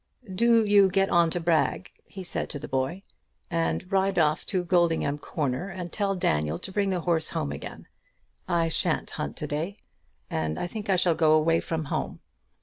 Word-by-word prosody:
"Do 230 +2 +4
you 200 -2 +5
get 195 +1 +2
on 170 -1 +4
Brag," 170 +1 0 0.2
he 190 - -8
said 175 - -3
to 150 - -4
the 145 - -7
boy, 135 +8 -2 0.5
"and 165 +2 0
ride 195 0 +1
off 155 -2 +2
to 185 -3 0
Goldingham 170 -5 +1
Corner, 145 +4 -3
and 175 -2 -6
tell 200 -2 0
Daniel 75 - 0
to 190 - -6
bring 200 0 0
the 185 -2 -1
horse 165 -2 +1
home 70 - -2
again. 70 - -8 0.6
I 170 -1 +1
shan't 160 - 0
hunt 70 - -5
to - - -3
day. 160 +7 -3 0.5
And 80 -1 -2
I - - -2
think 205 +3 -6
I 190 - +4
shall 180 -1 +3
go 160 -1 +3
away 165 +1 +3
from 160 -1 -3
home. - - -3
170 Hz, 185 wpm, -26 LUFS, 155-190 Hz, 0.6 s, you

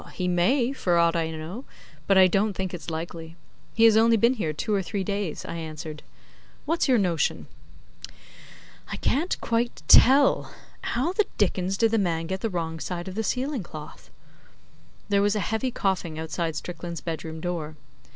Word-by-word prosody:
'He 180 - -2
may, 235 +9 +2
for 175 -10 +1
aught 170 0 +3
I 165 -1 0
know; 160 +9 -6 0.4
but 195 - +4
I 190 - +8
don't 195 +3 +2
think 190 -1 -4
it's 170 -2 -6
likely. 165 0 -6 0.4
He 225 - +3
has 225 -1 +7
only 225 +1 +5
been 235 +4 +4
here 205 -11 -2
two 210 +8 -2
or 200 - +2
three 190 +2 -3
days,' 200 -4 -3
I 170 - -5
answered. 155 -1 -7 0.6
'What's 330 +2 +1
your 255 -2 +4
notion?' 175 -6 0 1.4
'I - - -4
can't 325 +7 0
quite 235 +1 -1
tell. 275 +3 +6 0.3
How 270 +10 -1
the 420 +1 +2
dickens 190 -1 0
did 225 0 +3
the 225 - +2
man 165 -4 0
get 190 +3 -4
the 225 - -1
wrong 165 -3 -3
side 175 +2 -5
of 190 - -5
the 220 - -2
ceiling 260 +3 -1
cloth?' 155 -4 -10 1.0
There 200 -1 +3
was 205 +1 +2
a - - +1
heavy 220 +6 -1
coughing 190 -8 -2
outside 160 0 -3
Strickland's 170 -1 -6
bedroom 160 -1 -5
door. 160 -3 -4
185 Hz, 175 wpm, -26 LUFS, 165-225 Hz, 1.4 s, I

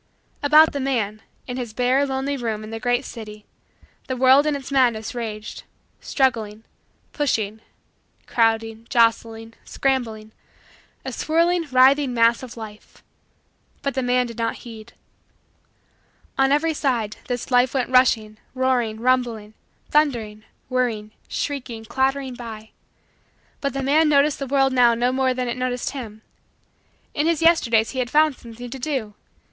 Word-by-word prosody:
About 305 +2 +6
the 285 - -2
man 225 -6 -1 0.2
in 250 0 -5
his 240 -4 -5
bare, 250 +3 +2
lonely, 270 +1 -2
room 225 -4 -3
in 215 - -9
the 225 - -5
great 245 +2 0
city, 215 -2 -9 0.6
the 260 - -3
world 265 +3 +5
in 300 - +1
its 275 -1 -7
madness 240 -5 +1
raged 215 -3 -6 0.4
struggling, 225 -6 -1 0.5
pushing, 220 -7 -1 0.6
crowding, 225 -1 0
jostling, 230 -1 +1
scrambling 225 -5 -2 0.7
a - - -3
swirling, 335 +1 +1
writhing, 260 +1 +4
mass 230 0 +3
of 250 -2 -10
life 215 -2 -11 0.8
but 275 - -1
the 265 - -1
man 250 0 +2
did 235 -1 -9
not 230 0 -1
heed. 225 -1 -11 1.4
On 270 0 +2
every 315 +3 +2
side, 240 -8 -1
this 245 +1 -4
life 250 +1 +3
went 255 -1 -1
rushing, 220 -4 +3 0.2
roaring, 250 -4 0
rumbling, 235 -4 0 0.4
thundering, 230 -8 0 0.2
whirring, 235 -5 -1 0.2
shrieking, 250 -6 -4
clattering 265 +2 -1
by. 225 -3 -9 0.9
But 280 - -2
the 275 0 -3
man 300 +3 +3
noticed 290 0 +3
the 275 - -4
world 270 0 +2
now 240 -2 +5
no 245 +2 +1
more 260 0 +1
than 250 -1 -2
it 240 - -3
noticed 250 -1 -2
him. 220 -6 -8 0.9
In 295 +2 0
his 330 -1 +1
Yesterdays 235 -10 +3
he 260 - -4
had 245 -1 -1
found 305 +1 +3
something 235 +1 -10
to 270 - -6
do. 255 -6 -3
250 Hz, 145 wpm, -22 LUFS, 225-270 Hz, 1.4 s, About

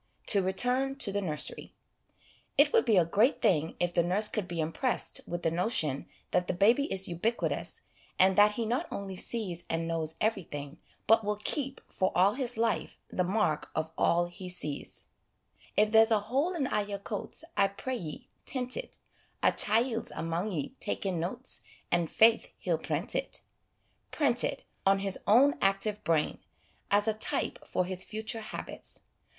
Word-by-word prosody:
To 200 - +5
return 250 +8 +2
to 230 -7 +1
the 205 +1 -1
nursery. 155 -6 -3 0.8
It - - +5
would 460 - +4
be 220 -5 +4
a 175 - +5
great 210 - +2
thing 165 -7 +1
if 175 0 0
the 170 - +3
nurse 185 +5 +3
could 205 -4 -2
be 170 -2 -5
impressed 165 - 0
with 175 0 -4
the 165 - +2
notion 165 - +2 0.2
that 180 - +1
the - - -1
baby 235 - +3
is 195 0 +3
ubiqui 200 +7 -1
tous, - - -5 0.4
and 190 0 +5
that 210 +1 +6
he 230 +1 -2
not 250 +10 -1
only 195 -1 -5
sees 185 -4 -2
and 165 0 -1
knows 160 -1 -1
everything, 160 -9 -3 0.3
but 225 +1 +5
will 210 0 0
keep, 270 -3 -1
for 185 - 0
all 190 +3 +4
his 250 -3 -2
life, 225 -2 -1
the 180 - 0
mark 185 -5 0
of 160 0 -2
all 175 +1 +2
he 180 +1 -8
sees: 155 -5 -4 0.4
" - - -29
If 210 0 +4
there's 225 0 +6
a 220 - +4
hole 275 - -1
in 295 -5 0
a' 210 - 0
your 205 0 -4
coats, 205 +8 -4
I 200 -1 +4
pray 250 +6 -4
ye, 160 -8 -7 0.2
tent 255 -1 -1
it; - - -5 0.5
A - - +6
chiel's 225 +2 +1
amang 170 +5 -2
ye 150 -7 -2
takin' 185 -4 -1
notes, 235 +10 -3 0.3
And, 170 -2 +2
faith, 230 0 +4
he'll - - -1
prent - - -2
it": - - -2 0.3
' - - -47 0.3
prent 255 -6 +3
it 275 - -2
' - - -42
on 195 0 +4
his 195 -1 -3
own 260 +7 +5
active 195 +2 +1
brain, 155 -1 +1 0.5
as 205 +1 +3
a 220 - +3
type 215 - -1
for 180 - 0
his 185 0 -1
future 220 +1 -4
habits. 215 - -6
200 Hz, 180 wpm, -30 LUFS, 175-230 Hz, 0.8 s, that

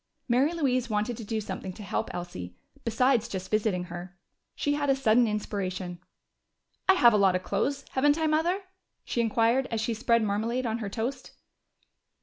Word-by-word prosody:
Mary 260 +5 +3
Louise 255 -7 0
wanted 215 +3 0
to 225 - -7
do 220 +1 -2
something 195 -2 -5
to 210 - -10
help 190 - -2
Elsie, 90 - -7 0.3
besides 235 0 +2
just 190 -4 -6
visiting 215 -4 +1
her. 180 +1 -8 0.4
She 290 - 0
had 290 -1 0
a 270 - +5
sudden 245 -2 +4
inspiration. 185 -4 -3 0.9
"I 380 - +8
have 240 -10 +6
a - - +4
lot 195 -2 +4
of 185 - -1
clothes, 280 0 -1
haven't 290 +3 +3
I, 320 - 0
Mother?" 330 +5 +1 0.4
she 235 - 0
inquired 230 +3 +2
as 225 - -1
she 230 +1 -1
spread 230 0 +2
marmalade 225 +5 -1
on 225 0 -1
her 210 -3 -4
toast. 250 +5 -4
230 Hz, 175 wpm, -28 LUFS, 200-260 Hz, 0.9 s, I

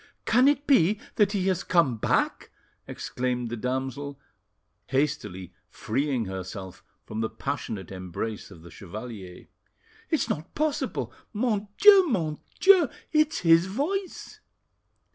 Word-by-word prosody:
"Can 250 +4 +4
it 290 0 +2
be 210 - +4 0.2
that 205 -1 +3
he 190 -3 0
has 180 -1 0
come 150 -10 +2
back?" - - 0 0.4
exclaimed 125 -2 -3
the - - -2
damsel, 130 +3 -3 0.7
hastily 105 - -2 0.2
freeing 130 0 -1
herself 95 0 -7 0.2
from 110 +1 -4
the 110 - -1
passionate 95 -5 -5
embrace 95 +3 -5
of 85 -5 -14
the 85 - -12
chevalier. 100 0 -9 0.6
"It's 315 - +1
not 155 +4 -4
possible! 305 -1 -1 0.2
Mon 210 -2 0
Dieu! 400 -3 +8
Mon 160 - -1 0.2
Dieu! 375 -7 +6 0.2
it's 305 0 +2
his 165 +1 +5
voice!" 340 - -3
145 Hz, 125 wpm, -26 LUFS, -, 0.7 s, Dieu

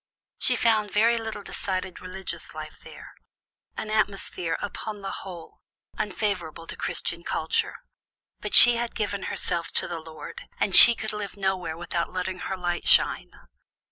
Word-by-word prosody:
She - - +2
found 215 -2 +1
very 230 +3 +3
little 220 -2 -6
decided 185 -2 -4
religious 185 +1 -7
life - - -9
there - - -13 0.6
an 215 - -5
atmosphere, 195 -5 -1
upon 205 0 -6
the 195 - -5
whole, 175 -4 -9 0.3
unfavorable 180 -5 -4
to - - -7
Christian 170 0 -4
culture. 160 -1 -2 0.6
But - - -2
she 240 -1 +10
had 235 0 -4
given 205 -2 -3
herself 170 -1 -2
to - - 0
the 170 - -5
Lord, 160 -1 -11
and 195 - 0
she 235 - +11
could 220 -1 -3
live 210 -1 -6
nowhere 185 -5 -2
without 170 0 -4
letting 185 0 -4
her 190 - -5
light 175 -1 -3
shine. - - +3
190 Hz, 150 wpm, -25 LUFS, 175-210 Hz, 0.6 s, she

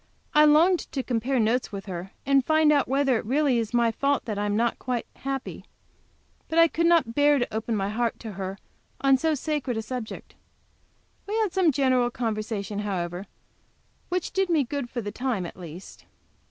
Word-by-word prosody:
I 300 0 +7
longed 330 +4 +4
to 265 - -2
compare 250 +2 0
notes 230 +3 +1
with 195 -1 -6
her, 180 -1 -6 0.2
and 275 -1 +4
find 315 +1 +4
out 285 -2 +3
whether 270 -2 +2
it - - -7
really 270 -1 +2
is 225 -2 -3
my 235 -1 +3
fault 280 +5 0
that 210 -3 -3
I 205 - 0
am 205 - 0
not 235 +2 0
quite 250 -2 -2
happy. 270 -1 -5 0.9
But 320 - -2
I 330 0 +7
could 335 +1 +1
not 330 -9 +3
bear 290 +2 +4
to 245 - -2
open 225 +1 -1
my 195 -1 -1
heart 230 +2 -1
to 225 - -6
her 190 0 -5 0.4
on 270 -1 +5
so 320 +3 +1
sacred 285 -4 -2
a 220 - -2
subject. 235 0 -6 0.9
We 420 - -2
had 435 -5 0
some 370 -4 +3
general 255 -3 +2
conversation, 215 -3 -3
however, 185 -2 -3 0.8
which 360 -1 -2
did 385 -1 0
me 320 -4 +3
good 270 -1 -4
for 240 - -4
the 205 -1 -5
time, 235 -5 -2
at - - -8
least. 175 0 -11
250 Hz, 195 wpm, -26 LUFS, 215-290 Hz, 0.9 s, I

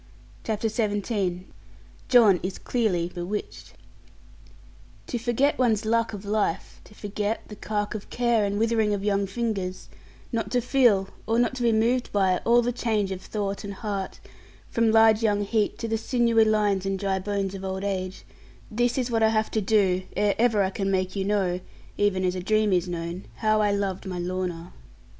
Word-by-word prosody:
CHAPTER 220 0 -1
XVII 205 -4 -1 0.6
JOHN 220 -7 +6
IS 185 +1 -4
CLEARLY 185 -8 -1
BEWITCHED 180 +4 -5 1.3
To 240 - -3
forget 245 +5 +1
one's 225 -4 +2
luck 230 +1 +1
of 205 0 -7
life, 205 -4 -2
to 210 - -17
forget 210 +2 -3
the 210 - -8
cark 210 0 -3
of 210 -1 -7
care 235 -3 +1
and 200 0 -1
withering 220 -1 +2
of 200 - -5
young 200 -1 +1
fingers; 195 -4 -3 0.4
not 230 -2 -2
to 250 - +3
feel, 235 -6 +3 0.2
or 225 +1 +1
not 245 +1 +1
be 235 -1 +3
moved 235 +3 +1
by, 190 -3 +2
all 240 +1 +5
the 245 - 0
change 215 -5 -1
of 190 -1 -5
thought 200 -1 -4
and 200 -1 -6
heart, 200 -2 -4 0.5
from 230 -1 +2
large 225 0 +5
young 205 -2 +2
heat 210 +1 0
to 230 - -4
the 225 0 -1
sinewy 235 -2 +3
lines 210 -3 +2
and 195 0 -1
dry 190 0 -1
bones 195 0 -2
of 195 -1 -7
old 190 0 -3
age 190 -2 -3 0.5
this 240 +3 +1
is 250 -2 -1
what 225 -1 +1
I 220 - +5
have 220 0 0
to 220 - 0
do 190 -3 +2 0.2
ere 205 -1 +3
ever 225 -4 +3
I 190 - -1
can 195 0 -2
make 185 0 0
you 195 -1 -1
know 195 -3 0 0.4
(even 190 -2 +1
as 180 - +1
a 185 - -4
dream 215 +1 +2
is 180 0 +1
known) 170 +1 -5
how 215 -1 +2
I 205 -1 +2
loved 200 -2 -2
my 180 -1 -4
Lorna. 180 -1 -4
205 Hz, 185 wpm, -25 LUFS, 190-225 Hz, 1.3 s, JOHN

